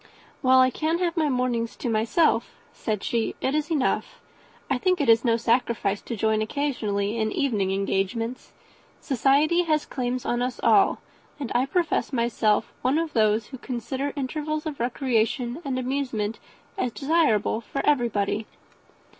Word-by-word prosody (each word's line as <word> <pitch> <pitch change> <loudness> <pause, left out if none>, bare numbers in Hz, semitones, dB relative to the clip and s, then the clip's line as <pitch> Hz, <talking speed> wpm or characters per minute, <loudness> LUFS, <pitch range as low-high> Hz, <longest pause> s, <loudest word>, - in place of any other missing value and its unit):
"While 260 -1 +6
I 255 0 +4
can 315 +5 0
have 345 -2 -1
my 315 -3 +1
mornings 250 -3 -1
to - - -5
myself," 230 +3 +1 0.2
said 210 -3 -3
she, 230 -2 -1
"it 265 - -1
is 305 +1 -1
enough. 300 -6 -1 0.5
I 265 -3 0
think 365 +5 +1
it 285 - 0
is 225 0 +5
no 230 -2 +3
sacrifice 230 -4 0
to 235 - -5
join 220 0 +1
occasionally 215 -5 -1
in 220 0 0
evening 210 -9 0
engagements. 200 +5 -2 0.5
Society 285 +6 +3
has 310 -2 +1
claims 250 -1 -3
on 240 0 0
us 250 0 -2
all; - - +4 0.4
and 275 -5 -4
I 250 +2 +2
profess 345 -2 0
myself 230 -4 +1
one 260 +4 +2
of 325 -2 -2
those 215 -1 +2
who 260 - -9
consider 260 +3 -3
intervals 305 +3 -3
of 305 -3 -5
recreation 240 +2 0
and 270 -3 -2
amusement 250 -5 -2 0.4
as 250 - 0
desirable 275 -7 +1
for 275 - -4
everybody." 220 -6 +1
250 Hz, 155 wpm, -25 LUFS, 225-285 Hz, 0.5 s, While